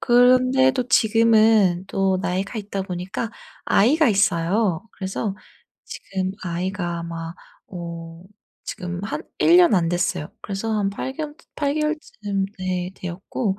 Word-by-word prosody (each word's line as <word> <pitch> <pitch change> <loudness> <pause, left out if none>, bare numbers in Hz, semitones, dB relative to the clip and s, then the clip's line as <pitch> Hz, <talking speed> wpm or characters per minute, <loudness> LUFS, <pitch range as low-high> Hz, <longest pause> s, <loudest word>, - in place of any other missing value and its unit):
그런데도 255 +1 +4
지금은 220 -5 +4
또 190 -1 +1
나이가 195 +4 -2
있다 200 -2 -4
보니까 190 +4 -4 0.3
아이가 290 +8 +4
있어요. 195 -1 +1
그래서 195 +1 -3 0.5
지금 190 -1 -4
아이가 175 -1 -3
아마 165 0 -6 0.3
어 170 -1 -8 0.4
지금 175 -1 -5
한 215 - -4 0.2
1 340 - +6
년 350 -7 +6
안 170 -2 +2
됐어요. 175 -3 -1
그래서 205 +3 -3
한 195 -1 +1
팔개월쯔 295 +8 -5 0.2
팔개월쯤 285 -10 -1
...예 180 -1 -2
되었고 190 +3 -3
195 Hz, 250 characters per minute, -23 LUFS, 180-230 Hz, 0.5 s, 1